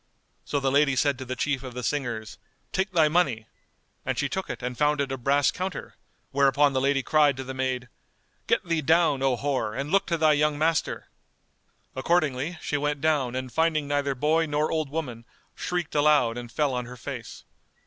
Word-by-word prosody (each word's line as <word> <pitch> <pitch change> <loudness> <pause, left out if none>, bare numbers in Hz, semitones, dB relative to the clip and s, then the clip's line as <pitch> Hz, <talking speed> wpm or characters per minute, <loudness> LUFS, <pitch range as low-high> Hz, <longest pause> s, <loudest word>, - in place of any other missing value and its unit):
So 145 - -1
the 135 -1 0
lady 140 0 +3
said 140 -1 +1
to 130 - -6
the 130 +1 -4
chief 140 0 -1
of 130 -2 -8
the 125 - -5
singers, 120 -7 -3 0.3
"Take 190 +1 -1
thy 160 -4 +4
money;" 150 -9 +1 0.6
and - - -2
she - - +1
took - - -4
it - - -6
and 125 0 -3
found 150 +2 +2
it 140 -1 -1
a - - -1
brass 140 +3 +2
counter; 185 0 -5 0.4
whereupon 140 +1 +3
the 130 - +1
lady 135 0 +1
cried 145 -2 +3
to 130 - -4
the 130 0 -6
maid, 130 -1 -2 0.6
"Get - - +1
thee 165 -2 0
down, 155 -2 +3
O 135 -2 +2
whore, 130 -5 -2
and 140 +2 -3
look 195 0 +3
to 170 - 0
thy 155 -1 +4
young 150 0 +1
master." 160 +1 0 0.9
Accordingly, 155 +1 0
she 145 - -1
went 145 0 -1
down 140 -5 +1
and 130 -1 -4
finding 160 -2 +1
neither 140 -1 0
boy 155 +5 +2
nor 150 +1 0
old 155 -3 -1
woman, 135 -7 -4 0.3
shrieked 175 -3 -3
aloud 145 -6 +3
and 120 -1 -7
fell 145 0 0
on 125 -1 -2
her 125 0 -10
face. 120 -2 -7
140 Hz, 200 wpm, -26 LUFS, 130-155 Hz, 0.9 s, thy